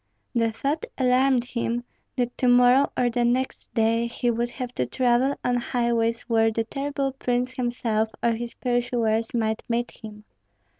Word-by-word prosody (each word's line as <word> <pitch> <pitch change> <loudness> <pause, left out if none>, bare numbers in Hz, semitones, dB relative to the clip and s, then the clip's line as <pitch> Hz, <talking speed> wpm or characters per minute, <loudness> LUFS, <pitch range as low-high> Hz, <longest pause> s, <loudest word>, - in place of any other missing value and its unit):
The 230 -2 +1
thought 280 +8 -2
alarmed 255 -1 +3
him, 240 -1 -2 0.3
that 245 -1 -1
to 255 - +2
morrow 245 +3 +5
or 245 -1 +2
the 240 +1 0
next 250 +2 -1
day 230 +1 +2
he 240 0 -1
would 235 +1 -1
have 250 0 -6
to 125 - -1
travel 250 - +2
on 245 0 +2
highways 235 -1 0
where 225 -1 +2
the 225 +1 -1
terrible 275 +3 -2
prince 250 -1 -1
himself 235 -3 -1
or 235 - +3
his 235 +1 -4
pursuers 240 -2 0
might 220 -1 0
meet 240 +1 -1
him. 210 -1 -11
240 Hz, 160 wpm, -25 LUFS, 230-250 Hz, 0.3 s, morrow